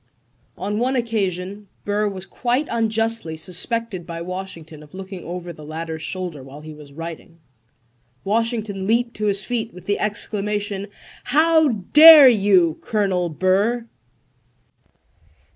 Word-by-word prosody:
On 205 Hz, +4 st, -3 dB
one 255 Hz, +3 st, 0 dB
occasion 200 Hz, -4 st, -2 dB, 0.2 s
Burr 205 Hz, +1 st, 0 dB
was 190 Hz, -1 st, -8 dB
quite 250 Hz, +8 st, -1 dB
unjustly 225 Hz, -6 st, -1 dB
suspected 185 Hz, +2 st, -2 dB
by 170 Hz, 0 st, -6 dB
Washington 170 Hz, -3 st, -7 dB
of 150 Hz, +4 st, -15 dB
looking 190 Hz, -1 st, -8 dB
over 175 Hz, 0 st, -7 dB
the 155 Hz, -, -13 dB
latter's 160 Hz, +1 st, -6 dB
shoulder 180 Hz, -5 st, -5 dB
while 135 Hz, +3 st, -11 dB
he 155 Hz, 0 st, -10 dB
was 150 Hz, -2 st, -14 dB
writing. 165 Hz, +2 st, -9 dB, 0.9 s
"Washington 215 Hz, -2 st, -2 dB
leaped 235 Hz, +2 st, +1 dB
to 210 Hz, 0 st, -1 dB
his 200 Hz, 0 st, 0 dB
feet 230 Hz, -1 st, -3 dB
with 180 Hz, -1 st, -12 dB
the 205 Hz, +1 st, -1 dB
exclamation: 205 Hz, -1 st, -3 dB, 0.4 s
"How 315 Hz, +2 st, +4 dB
dare 290 Hz, -, +8 dB
you, 195 Hz, -8 st, +3 dB
Colonel 190 Hz, -5 st, -1 dB
Burr?" 195 Hz, +8 st, 0 dB
200 Hz, 125 wpm, -21 LUFS, 175-225 Hz, 0.9 s, dare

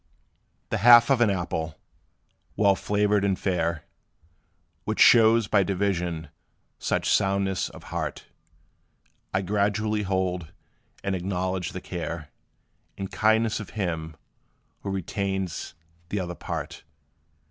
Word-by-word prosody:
The -, -, -1 dB
half 120 Hz, +4 st, +8 dB
of 130 Hz, -3 st, +3 dB
an 115 Hz, -, +5 dB
apple, 80 Hz, -4 st, -2 dB, 0.8 s
well 100 Hz, -2 st, +4 dB
flavored 105 Hz, 0 st, +1 dB
and 95 Hz, -2 st, +1 dB
fair, 85 Hz, -4 st, -1 dB, 1.0 s
Which -, -, -3 dB
shows 115 Hz, -2 st, +6 dB
by 100 Hz, -1 st, +4 dB
division 90 Hz, -4 st, -1 dB, 0.5 s
such -, -, -1 dB
soundness 95 Hz, -1 st, +1 dB
of -, -, -13 dB
heart, -, -, -3 dB, 1.1 s
I 95 Hz, +1 st, 0 dB
gratefully 105 Hz, +2 st, 0 dB
hold; 95 Hz, -4 st, -2 dB, 0.5 s
and 100 Hz, -, -1 dB
acknowledge 90 Hz, -1 st, -2 dB
the 95 Hz, -, -5 dB
care 80 Hz, -4 st, -5 dB, 0.7 s
And 95 Hz, -1 st, -5 dB
kindness 110 Hz, +1 st, +2 dB
of 105 Hz, 0 st, -9 dB
him, 80 Hz, -5 st, -3 dB, 0.6 s
who 100 Hz, -, -6 dB
retains 95 Hz, -2 st, -3 dB, 0.3 s
t 105 Hz, -, -1 dB
'other 90 Hz, -1 st, -3 dB
part. -, -, -6 dB
95 Hz, 115 wpm, -26 LUFS, 90-105 Hz, 1.1 s, half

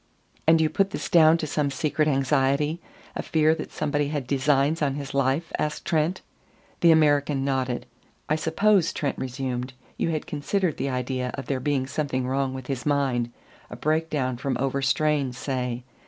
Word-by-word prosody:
"And 160 Hz, 0 st, +6 dB
you 160 Hz, -, +3 dB
put 195 Hz, +5 st, +1 dB
this -, -, -5 dB
down 160 Hz, -1 st, +6 dB
to 165 Hz, -, -3 dB
some 150 Hz, -1 st, 0 dB
secret 155 Hz, +2 st, 0 dB
anxiety, 140 Hz, +3 st, +1 dB, 0.3 s
a -, -, -2 dB
fear 155 Hz, 0 st, +3 dB
that 160 Hz, -, -6 dB
somebody 145 Hz, -1 st, -1 dB
had 145 Hz, -3 st, -3 dB
designs 140 Hz, +4 st, +2 dB
on 140 Hz, -2 st, +1 dB
his 140 Hz, -1 st, -6 dB
life?" 140 Hz, +4 st, 0 dB
asked 150 Hz, 0 st, -2 dB
Trent. 165 Hz, +3 st, 0 dB, 0.6 s
The 170 Hz, -, +5 dB
American 145 Hz, -3 st, +3 dB
nodded. 130 Hz, -3 st, -1 dB, 0.4 s
"I 155 Hz, -, +2 dB
suppose," 175 Hz, +3 st, +2 dB
Trent 145 Hz, -, -2 dB
resumed, 130 Hz, -1 st, -3 dB, 0.2 s
"you -, -, 0 dB
had 155 Hz, -2 st, -2 dB
considered 160 Hz, +3 st, -1 dB
the 140 Hz, -, -1 dB
idea 125 Hz, 0 st, -2 dB
of 135 Hz, -, -6 dB
there 135 Hz, -2 st, -1 dB
being 135 Hz, -1 st, 0 dB
something 130 Hz, -2 st, -2 dB
wrong 135 Hz, 0 st, 0 dB
with 130 Hz, -1 st, -7 dB
his 130 Hz, -1 st, -3 dB
mind 135 Hz, -5 st, 0 dB, 0.4 s
a -, -, -7 dB
break 160 Hz, +2 st, 0 dB
down 130 Hz, -5 st, -1 dB
from 135 Hz, 0 st, -2 dB
overstrain, 135 Hz, +1 st, +1 dB
say. 125 Hz, -2 st, -3 dB
140 Hz, 170 wpm, -25 LUFS, 130-155 Hz, 0.6 s, And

